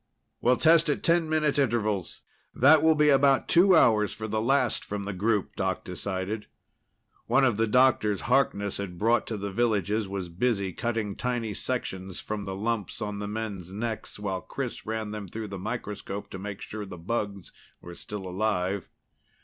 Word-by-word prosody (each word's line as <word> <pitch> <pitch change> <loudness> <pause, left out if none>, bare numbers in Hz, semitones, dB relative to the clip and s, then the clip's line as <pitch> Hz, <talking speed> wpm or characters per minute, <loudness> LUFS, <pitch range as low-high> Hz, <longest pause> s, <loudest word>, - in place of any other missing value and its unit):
"We'll 125 +1 +4
test 165 0 +5
at 145 - -1
ten 165 -1 +3
minute 155 -2 +2
intervals. 110 -8 0 0.3
That 145 +4 +6
will 160 0 +5
be 150 0 +4
about 135 -1 +4
two 185 +2 +6
hours 105 -9 +4
for 110 +1 -5
the 110 0 -1
last 130 0 +2
from 105 0 -4
the 100 0 -4
group," 105 +2 0
Doc 95 -1 -1
decided. 95 +3 -4 0.8
One 135 - +4
of 120 -5 +2
the 115 0 +2
doctors 110 -4 +3
Harkness 110 -6 +1
had 95 -3 -5
brought 115 +3 +2
to 110 - -3
the 100 0 -4
villages 105 -1 +1
was 95 -2 -4
busy 100 +1 -1
cutting 110 -3 -2
tiny 120 -4 -2
sections 95 -7 -4
from 105 -2 -4
the 95 -1 -4
lumps 105 -1 -2
on 105 -2 -4
the 105 - -4
men's 105 -4 -5
necks, 110 +2 -4
while 95 -3 -3
Chris - - -5
ran 110 -1 -3
them 105 -2 -6
through 110 +3 -6
the 100 -1 -6
microscope 105 -2 -5
to 95 - -6
make 100 0 -6
sure 110 0 -6
the 95 -3 -8
bugs 100 +1 -3 0.3
were 85 - -10
still 100 +2 -7
alive. 95 -1 -1
105 Hz, 175 wpm, -27 LUFS, 100-120 Hz, 0.8 s, That